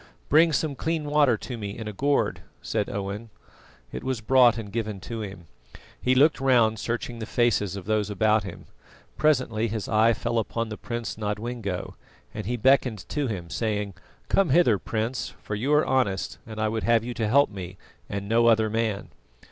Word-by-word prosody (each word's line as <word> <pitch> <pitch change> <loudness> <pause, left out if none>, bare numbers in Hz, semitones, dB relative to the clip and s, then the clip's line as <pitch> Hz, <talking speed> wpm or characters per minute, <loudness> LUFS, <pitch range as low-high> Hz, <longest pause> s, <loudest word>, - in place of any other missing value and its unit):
"Bring 160 +3 +6
some 150 +1 0
clean 160 +2 -2
water 145 -5 +3
to 125 +2 -6
me 100 -1 -5
in 110 -2 -6
a 105 - -5
gourd," 140 +7 0 0.2
said 105 -2 -2
Owen. 100 +3 -4 0.6
It - - -6
was 130 -3 -2
brought 120 +1 +5
and 105 -3 -6
given 110 -3 -3
to 115 -1 -5
him. 95 -4 -8 0.6
He 130 +1 +2
looked 145 +2 +4
round, 120 -5 +3
searching 120 +1 -3
the 110 - -5
faces 115 -6 +1
of 95 -3 -7
those 105 -1 0
about 110 +1 +2
him. 95 -3 -9 0.5
Presently 130 -7 +2
his 110 -2 -4
eye 110 +1 +4
fell 115 +1 -1
upon 115 +1 -2
the 110 - -5
Prince 120 -2 -5
Nodwengo, 105 -2 -3 0.4
and 105 -3 -5
he 120 +1 -1
beckoned 120 -6 +2
to 145 -2 -1
him, 90 -7 -5
saying: 105 -3 -2 0.3
"Come 195 -4 +2
hither, 130 - +4
Prince, 115 +5 -3
for - - -5
you 120 +8 -1
are 150 +1 +4
honest, 115 -8 0
and 110 -1 -7
I 110 - +1
would 110 +1 -2
have 115 0 +3
you 120 +1 -4
to 115 -2 -1
help 140 +2 +4
me, 90 -2 -7 0.3
and 100 0 -4
no 115 +2 +3
other 110 -2 +4
man." 110 -3 -1
115 Hz, 190 wpm, -26 LUFS, 105-125 Hz, 0.6 s, Bring